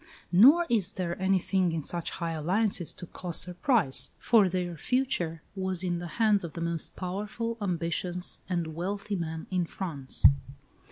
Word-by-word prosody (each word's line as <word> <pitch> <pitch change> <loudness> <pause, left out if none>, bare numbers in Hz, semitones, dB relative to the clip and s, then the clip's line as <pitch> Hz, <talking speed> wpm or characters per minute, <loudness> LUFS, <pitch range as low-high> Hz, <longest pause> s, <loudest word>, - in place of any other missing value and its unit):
Nor 275 - +7
is 215 -7 +2
there 175 -2 -3
anything 190 -1 +2
in 160 -2 -2
such 170 +2 -1
high 170 -2 -3
alliances 175 +3 +2
to - - -9
cause 175 0 -3
surprise; 180 - +2
for 215 -5 +4
their 175 -1 -2
future 175 - -1
was 190 -2 -2
in 175 -2 -1
the 175 - -5
hands 215 -4 +3
of 170 - -6
the - - -6
most 170 -1 -3
powerful, 210 +5 -4
ambitious, 175 -1 -3
and 170 -3 -2
wealthy 200 +5 -3
man 160 -2 -4
in 180 -2 0
France. 150 -10 -4
180 Hz, 155 wpm, -28 LUFS, 170-200 Hz, -, Nor